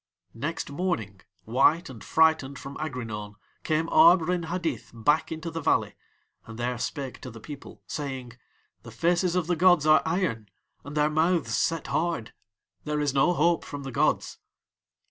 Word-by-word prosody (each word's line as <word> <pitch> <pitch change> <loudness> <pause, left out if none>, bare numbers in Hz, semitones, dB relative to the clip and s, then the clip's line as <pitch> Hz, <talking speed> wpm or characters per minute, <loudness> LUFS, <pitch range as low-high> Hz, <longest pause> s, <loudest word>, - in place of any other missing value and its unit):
Next 145 +5 -4
morning, 115 - -3 0.2
white 135 - +3
and 115 -7 -10
frightened 160 -4 +2
from 140 +1 -8
Aghrinaun, 115 -8 -5 0.3
came 155 +1 0
Arb 315 - +6
Rin 180 -2 0
Hadith 165 -9 -3
back 150 +9 +1
into 160 +1 -5
the 165 0 -4
valley, - - +1 0.5
and 115 0 -9
there 120 0 -2
spake 135 0 -4
to - - -7
the 115 - -11
people, 115 -5 -11
saying: 130 -4 -5 0.5
"The 115 - -11
faces 170 +9 +1
of 180 -3 +1
the 175 +1 0
gods 175 -2 +4
are 155 0 +6
iron 160 - -1 0.3
and 145 +2 -7
their 150 +1 +3
mouths 165 +1 +1
set 165 -1 0
hard. 165 -9 -2 0.5
There 150 0 -2
is 145 -2 0
no 150 +6 +3
hope 170 +2 +2
from 145 -1 -7
the 135 - -6
gods." - - 0
150 Hz, 165 wpm, -27 LUFS, 125-165 Hz, 0.5 s, Arb